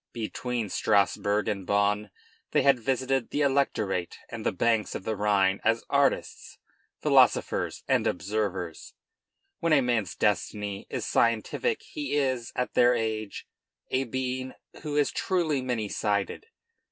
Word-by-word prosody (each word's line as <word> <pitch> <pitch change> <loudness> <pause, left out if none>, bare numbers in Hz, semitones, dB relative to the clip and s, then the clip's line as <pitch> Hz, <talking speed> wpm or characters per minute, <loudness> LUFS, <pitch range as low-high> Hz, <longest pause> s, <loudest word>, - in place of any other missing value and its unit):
Between 115 -1 -3
Strasburg 100 +2 +1
and 100 -2 -2
Bonn 100 +2 +1 0.4
they - - +4
had 135 -2 +5
visited 130 +1 0
the 145 - -1
Electorate 120 -10 0
and - - -6
the - - +1
banks 115 -2 +1
of - - -5
the 110 +1 -2
Rhine 100 -2 +2
as 115 +1 +2
artists, 140 -1 0 0.5
philosophers, - - +3
and - - +2
observers. 95 -3 -3 0.6
When 165 -1 +2
a 140 - +5
man's 115 -8 0
destiny 105 -1 -1
is - - -3
scientific 115 - +1
he 295 - -4
is, 130 -5 0
at 125 - -2
their 120 0 +5
age, 110 -2 -3 0.5
a 130 +1 +1
being 130 +1 -3 0.3
who 150 -2 -4
is 145 - +2
truly 165 -7 0
many 120 -4 -2
sided. 100 - -2
115 Hz, 135 wpm, -27 LUFS, 105-130 Hz, 0.6 s, had